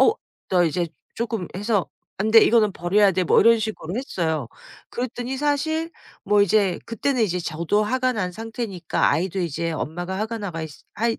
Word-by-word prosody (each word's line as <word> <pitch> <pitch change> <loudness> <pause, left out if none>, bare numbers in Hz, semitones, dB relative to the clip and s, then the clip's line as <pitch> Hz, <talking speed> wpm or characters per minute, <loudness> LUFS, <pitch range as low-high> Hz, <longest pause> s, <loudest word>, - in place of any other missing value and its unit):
"어 440 - +6 0.4
너 180 -2 +3
이제 170 +1 0 0.3
쪼끔 225 -6 -3
해서 205 0 0 0.3
안 215 +3 0
돼 225 0 +9
이거는 220 -4 +4
버려야 195 +4 +3
돼." 185 0 0
뭐 - - +4
이런 230 0 +6
식으로 210 -6 -4
했어요. 160 - -2 0.4
그랬더니 245 +1 -4
사실 315 +3 0 0.3
뭐 205 +1 +3
이제 200 -2 +3
그때는 245 +2 0
이제 180 -4 0
저도 170 +6 0
화가 255 +3 +1
난 185 -5 -2
상태니까 225 -5 -1
아이도 185 +3 -1
이제 165 0 -2
엄마가 175 +4 -4
화가 225 +1 -3
나가 175 -6 -4
있 160 - -6 0.2
화이 230 +2 0
205 Hz, 345 characters per minute, -23 LUFS, 175-230 Hz, 0.4 s, 돼